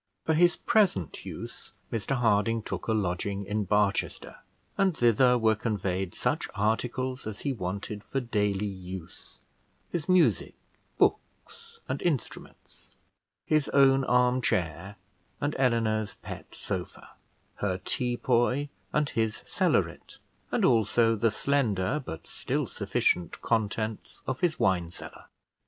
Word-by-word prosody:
For 160 - +2
his 175 +2 +4
present 185 - +1
use - - -8 0.2
Mr 115 +4 -1
Harding 115 -2 +2
took - - -5
a - - +1
lodging 100 -1 -1
in 105 +1 -1
Barchester, 105 0 0 0.4
and 190 -4 +2
thither 125 +1 +5
were 110 -2 +4
conveyed 95 -4 -2
such 135 +6 -1
articles 120 +4 -1
as 105 -2 -6
he 140 - -1
wanted 100 0 -4
for 135 - -1
daily 105 -5 0
use: 95 -3 -8 0.5
his 170 -2 -3
music, 185 -2 +3 0.4
books, 460 0 -1
and - - -3
instruments, 155 -9 -5 0.5
his 155 -2 +2
own 135 -1 +5
arm 125 +1 +3
chair, 90 0 -1 0.4
and 145 +1 -1
Eleanor's 115 -4 +1
pet - - -9
sofa; - - -5 0.5
her 95 -3 -1
teapoy 125 +5 0 0.2
and 150 -1 +1
his 110 -3 -1
cellaret, - - 0 0.3
and - - +2
also 115 -1 +4
the 115 +2 +2
slender 115 -1 0
but 80 -9 -7
still - - -2
sufficient 90 -2 0
contents 110 0 -2
of 130 -1 -3
his 170 -3 +1
wine 95 -7 +2
cellar. - - -10
115 Hz, 125 wpm, -28 LUFS, 100-130 Hz, 0.5 s, thither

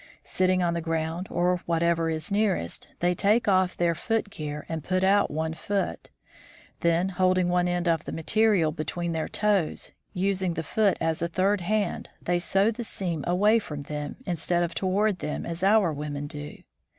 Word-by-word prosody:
Sitting 185 0 +1
on 170 -1 +1
the 170 - -2
ground 165 +2 -2
or 180 +1 +1
whatever 165 0 +1
is 160 +3 -2
nearest, 200 - 0
they 175 +1 +3
take 210 +6 +2
off 185 -2 +2
their 170 -1 +2
footgear 155 -7 -3
and 160 -2 -4
put 185 +2 0
out 200 +1 +4
one 160 +2 -2
foot. 195 +5 -3 0.7
Then 170 +2 +2
holding 185 -1 +2
one 180 0 +2
end 175 0 -1
of 165 -2 +1
the - - -5
ma 165 - -5
terial 200 -7 +3
between 170 +2 -3
their 160 -1 -2
toes, 205 -6 0 0.2
using 190 -2 0
the 165 - -2
foot 205 +5 +2
as 160 -1 -1
a 170 - +1
third 190 +3 +1
hand, 205 +1 -1
they 175 0 0
sew 195 +5 +2
the 235 +2 -5
seam 175 -8 -2
away 205 +6 +4
from 150 -8 -7
them, 150 0 -5
instead 175 0 0
of 170 -1 -2
toward 195 +1 +1
them 150 - -4
as 170 +1 -5
our 200 -4 +4
women 145 0 -4
do. 145 0 -8
175 Hz, 180 wpm, -26 LUFS, 165-195 Hz, 0.7 s, out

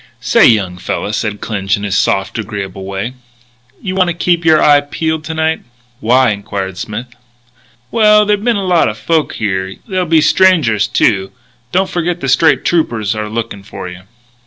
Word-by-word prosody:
"Say, - - +4
young 95 -6 +1
fella," 105 - -3
said 105 -1 -3
Clinch 100 -2 -1
in 100 - -7
his 100 -2 -1
soft, 95 +3 0
agreeable 100 -3 -5
way, 100 +5 -4 0.7
"you 185 - -3
want 185 -1 +2
to 175 - -2
keep 175 0 +1
your 160 -1 +5
eye 145 -1 +5
peeled 160 +2 -3
to 160 +1 -5
night." 160 0 0 0.4
"Why?" 125 +1 +3
inquired 95 -2 -5
Smith. 110 +5 -5 0.9
"Well, 210 -1 +5
there'll 205 -1 +1
be 240 - 0
a 235 - +2
lot 185 - +2
o' 105 - -5
folks 155 +8 -1
here. 95 -2 -2
There'll 185 -4 -1
be 160 0 +4
strangers, 155 - +3
too.... 95 -3 +1 0.4
Don't 190 +1 +1
forget 175 0 -2
the 135 - -3
State 160 +4 +3
Troopers 115 -11 0
are 105 -1 -4
looking 110 -2 -4
for 95 -1 -8
you." 90 0 -9
115 Hz, 180 wpm, -14 LUFS, 100-165 Hz, 0.9 s, your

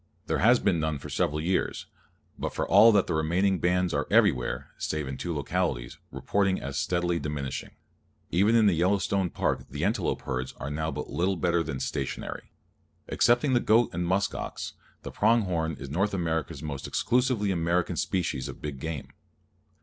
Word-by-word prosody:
There - - -1
has 120 +5 +6
been 95 -7 +1
none 80 -1 -1
for - - -9
several 75 +1 0
years, 90 +4 -1 0.5
but - - -4
for - - -1
all 115 +1 +8
that 100 -3 +3
the - - -2
remaining 90 +5 +1
bands 90 0 +1
are - - -1
everywhere 60 0 +2
(save 75 -2 -2
in 65 - -4
two 85 +7 -4
localities) 75 -5 -2
reported 95 -2 0
as 70 0 -4
steadily 85 -1 0
diminishing. 75 -4 -4 0.6
Even 100 +6 +3
in 115 -2 +5
the 100 - +5
Yellowstone 95 +2 +1
Park - - -1
the - - -2
antelope - - -1
herds 65 0 -3
are 70 - -4
now 80 +2 -2
but - - -5
little 95 +3 +1
better 85 -1 +1
than 75 -5 -4
stationary. - - -4 0.6
Excepting 120 +3 +3
the 120 - +4
goat 115 0 +3
and 85 0 -2
musk 95 +3 +1
ox, - - -5 0.3
the - - -6
prong 115 +2 +3
horn 80 -4 -1
is 70 - -7
North 100 +6 0
America's 80 -4 -2
most 70 -3 -5
exclusively 125 -5 +1
American 85 0 0
species 80 -8 -1
of 70 - -8
big 75 -3 -6
game. 80 -1 -5
85 Hz, 175 wpm, -27 LUFS, 75-100 Hz, 0.6 s, all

